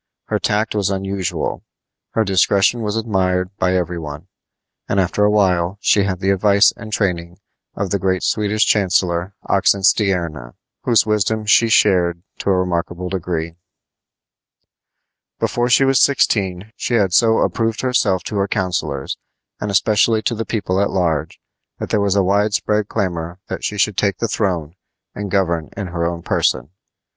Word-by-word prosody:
Her - - 0
tact 105 +1 0
was 100 -3 0
unusual. 95 -2 -3 0.5
Her 110 - +2
discretion 100 +3 +2
was 105 -1 -2
admired 95 -4 -1
by 90 0 +1
every 90 -1 -1
one; 75 -2 -8 0.6
and 100 - +1
after 95 +2 +1
a 105 - +4
while 95 -3 +1
she 100 -1 +3
had 95 -2 -3
the 95 0 +2
advice 100 +1 +4
and 110 -1 -10
training 85 -4 -2 0.4
of 100 -2 -3
the 100 - +1
great 95 0 0
Swedish 105 0 +1
chancellor, 90 -2 +1
Oxenstierna, 95 - +1 0.3
whose 115 -3 +4
wisdom 105 0 0
she 115 +2 +4
shared 90 -5 +3 0.2
to - - -2
a 95 - +3
remarkable 90 0 -2
degree. 85 -3 -3 1.9
Before 120 0 0
she 135 +2 +5
was 135 0 +3
sixteen 100 -6 +1
she 120 - -2
had 100 -5 +2
so 110 +2 +4
approved 115 -1 0
herself 115 -7 +1
to 105 - -4
her 100 0 +1
counselors, 85 -9 -2 0.4
and 105 - -3
especially 110 +2 +2
to - - 0
the 115 0 -3
people 100 -4 -1
at 100 - +1
large, 80 -5 -1 0.4
that - - -6
there 105 - +2
was 100 -1 +1
a 100 - +3
wide 100 +3 +1
spread 105 -2 0
clamor 85 -1 -3
that - - -5
she 105 - -2
should 105 -1 +1
take 100 -2 +1
the 115 - -1
throne 90 -8 -2 0.4
and 100 -1 -5
govern 85 -5 0
in 100 - -3
her 85 -1 -1
own 85 0 -5
person. 75 - 0
95 Hz, 160 wpm, -19 LUFS, 90-105 Hz, 1.9 s, she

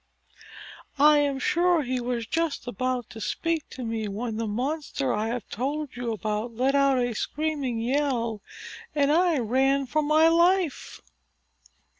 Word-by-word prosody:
"I 295 +1 +6
am 285 -2 +1
sure 350 +1 +2
he 255 0 -2
was 240 -1 -2
just 325 +1 -2
about 250 +1 -2
to 220 - -9
speak 330 +6 -2
to 260 - -7
me 225 -2 -3
when 220 +2 -4
the 225 0 -2
monster 270 +4 -2
I 215 +1 -1
have 240 +1 -4
told 280 +4 -3
you 245 -1 -3
about 220 +1 -3
let 260 +4 +1
out 275 -1 +3
a 245 -1 0
screaming 290 -1 -2
yell, 235 -3 -1 0.5
and 285 -1 +3
I 340 0 +3
ran 270 +3 +2
for 305 +4 0
my 305 +2 +4
life." 340 0 +1
265 Hz, 150 wpm, -26 LUFS, 235-300 Hz, 0.5 s, I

